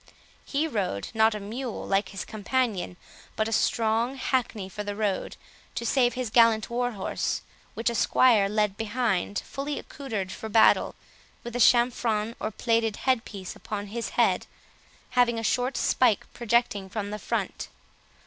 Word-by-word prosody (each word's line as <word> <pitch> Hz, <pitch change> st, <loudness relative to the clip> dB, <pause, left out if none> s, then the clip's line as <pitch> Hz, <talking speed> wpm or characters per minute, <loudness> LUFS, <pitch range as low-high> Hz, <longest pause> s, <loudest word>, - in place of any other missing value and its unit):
He 300 Hz, +3 st, -1 dB
rode, 190 Hz, -, -2 dB
not 220 Hz, -1 st, +4 dB
a -, -, -4 dB
mule, 230 Hz, +4 st, -5 dB
like 195 Hz, +1 st, +1 dB
his 195 Hz, -, -6 dB
companion, 215 Hz, -4 st, -1 dB, 0.4 s
but 220 Hz, -, 0 dB
a -, -, -4 dB
strong 225 Hz, +3 st, +1 dB
hackney 245 Hz, -7 st, -1 dB
for 210 Hz, +2 st, -6 dB
the 205 Hz, 0 st, -4 dB
road, 205 Hz, -3 st, -2 dB, 0.4 s
to 235 Hz, -, -3 dB
save 245 Hz, -2 st, +2 dB
his 250 Hz, -4 st, -3 dB
gallant 230 Hz, -1 st, +4 dB
war 245 Hz, 0 st, 0 dB
horse, 195 Hz, -2 st, -2 dB, 0.3 s
which 225 Hz, -, -3 dB
a 235 Hz, -, +3 dB
squire 225 Hz, -3 st, +4 dB
led 210 Hz, -1 st, 0 dB
behind, 215 Hz, -4 st, -1 dB
fully 285 Hz, +1 st, -4 dB
accoutred 215 Hz, -9 st, -5 dB
for 220 Hz, -, -6 dB
battle, 220 Hz, +1 st, +4 dB, 0.5 s
with 240 Hz, 0 st, -7 dB
a -, -, -1 dB
chamfron 235 Hz, -2 st, +3 dB
or 215 Hz, -, -2 dB
plaited 225 Hz, 0 st, 0 dB
head 255 Hz, -3 st, +2 dB
piece 190 Hz, -3 st, -7 dB
upon 205 Hz, -1 st, -5 dB
his 235 Hz, -1 st, -3 dB
head, -, -, +3 dB, 0.6 s
having 240 Hz, -2 st, +3 dB
a 225 Hz, -, -3 dB
short 250 Hz, +3 st, 0 dB
spike 235 Hz, -6 st, +2 dB
projecting 235 Hz, -4 st, 0 dB
from 205 Hz, 0 st, -4 dB
the 210 Hz, -, -4 dB
front. -, -, -3 dB
225 Hz, 160 wpm, -27 LUFS, 205-245 Hz, 0.6 s, not